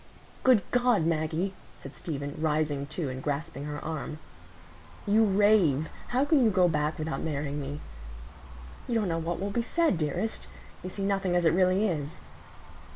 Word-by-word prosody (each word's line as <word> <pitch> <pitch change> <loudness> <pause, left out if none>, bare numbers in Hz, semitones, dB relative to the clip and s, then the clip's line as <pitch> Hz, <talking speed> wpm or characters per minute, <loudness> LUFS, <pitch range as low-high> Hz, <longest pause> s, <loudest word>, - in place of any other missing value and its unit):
"Good 250 -7 +5
God, 245 -8 +3
Maggie!" 165 +3 0 0.2
said 135 - -10
Stephen, 145 -4 -5
rising 150 -2 0
too 150 +1 -3
and 130 0 -5
grasping 145 0 -3
her 150 0 -4
arm, 155 -1 -4 0.9
"you 215 +2 +4
rave. 195 -8 +3 0.2
How 255 +3 +1
can 290 -3 +4
you 225 - +5
go 185 -3 +4
back 150 -1 0
without 155 +1 -3
marrying 145 -2 -2
me? 145 +2 -5 1.1
You 240 - -1
don't 215 -3 +1
know 165 0 0
what 165 +1 -3
will 200 +1 -2
be 235 - 0
said, 315 - +1
dearest. 155 +9 -2 0.3
You 185 - -5
see 195 +1 -3
nothing 195 -2 +1
as 175 -1 +2
it 160 - +5
really 185 +3 +3
is." 155 -2 -3
165 Hz, 165 wpm, -28 LUFS, 150-200 Hz, 1.1 s, Good